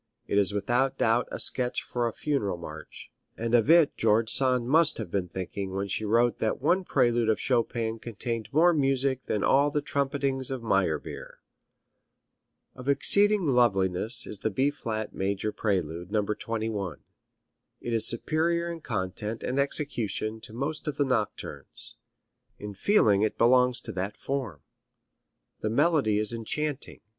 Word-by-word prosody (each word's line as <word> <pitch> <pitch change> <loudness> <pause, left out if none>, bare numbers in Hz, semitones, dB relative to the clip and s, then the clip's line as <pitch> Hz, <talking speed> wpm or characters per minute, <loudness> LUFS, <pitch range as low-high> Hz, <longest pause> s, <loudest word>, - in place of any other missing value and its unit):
It 100 - +1
is 100 0 +2
without 120 +6 0
doubt 115 +2 +2
a - - -5
sketch 125 -1 -1
for 120 -1 -2
a - - -2
funeral 110 -10 -2
march, 80 -2 -10 0.3
and 115 +1 -3
of 120 +3 +4
it 165 -2 +5
George 110 0 +3
Sand 125 -3 +3
must 160 +3 +4
have 105 -7 -6
been 95 -3 -1
thinking 95 +2 -5
when 100 +1 -1
she 110 +2 -2
wrote 115 +3 +2
that 110 - -1
one 175 +7 +2
prelude 120 -7 +2
of 110 - +2
Chopin 115 -2 -1
contained 115 -1 -4
more 170 +4 +5
music 135 -3 0
than 105 - -1
all 140 +2 +4
the 150 - 0
trumpetings 140 -2 -1
of 130 -3 -4
Meyerbeer. 95 -8 -1 1.4
Of 125 +2 -6
exceeding 205 +7 +4
loveliness 110 - +2
is 105 - -5
the 110 - -1
B 135 +7 +1
flat 110 -6 -5
major 100 +2 -2
prelude, 90 -5 -2
No. 105 -1 +1
21. 105 -4 -3 0.8
It 120 - -4
is 115 - +3
superior 170 +7 0
in 165 -1 -7
content 105 0 -4
and 130 +2 -1
execution 110 -7 -2
to - - -11
most 140 +7 -4
of 145 -2 -3
the 145 - +2
nocturnes. 115 -6 -3 0.6
In 105 0 -7
feeling 105 - +3
it 110 - 0
belongs 125 +1 +4
to - - -7
that 95 +2 -4
form. 130 - -4 1.0
The 110 - -2
melody 125 -3 +2
is 105 +2 -1
enchanting. 140 +5 -3
115 Hz, 155 wpm, -27 LUFS, 105-135 Hz, 1.4 s, it